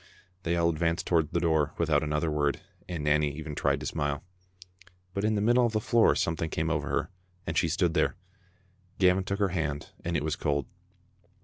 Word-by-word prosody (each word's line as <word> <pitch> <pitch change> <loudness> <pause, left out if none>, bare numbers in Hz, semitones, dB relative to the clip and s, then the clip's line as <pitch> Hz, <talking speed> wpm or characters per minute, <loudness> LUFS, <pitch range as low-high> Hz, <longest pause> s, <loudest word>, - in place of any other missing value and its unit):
They 85 -1 0
all 85 0 +3
advanced 85 +1 0
toward 80 -4 +2
the 85 - +1
door 80 -3 +1
without 80 -3 +2
another 75 +1 0
word, 75 -3 0 0.3
and 85 -4 -3
Nanny 75 0 +3
even 75 -1 -6
tried - - +1
to - - -5
smile. 75 0 -2 0.9
But 100 - -2
in 110 0 +2
the 100 - 0
mid 120 +4 +3
die - - +6
of 120 -2 +2
the 110 - +2
floor 115 +1 +4
something 80 -1 -1
came 80 +1 -1
over 75 -2 -1
her, - - -1 0.3
and 80 - -3
she 85 - +3
stood 85 +1 +1
there. - - +2 0.8
Gavin 95 0 +4
took 100 +1 -2
her 100 -1 +1
hand, 80 -5 -3
and 85 -1 0
it 75 - -2
was 80 0 -1
cold. 70 -5 -1
80 Hz, 205 wpm, -28 LUFS, 75-90 Hz, 0.9 s, die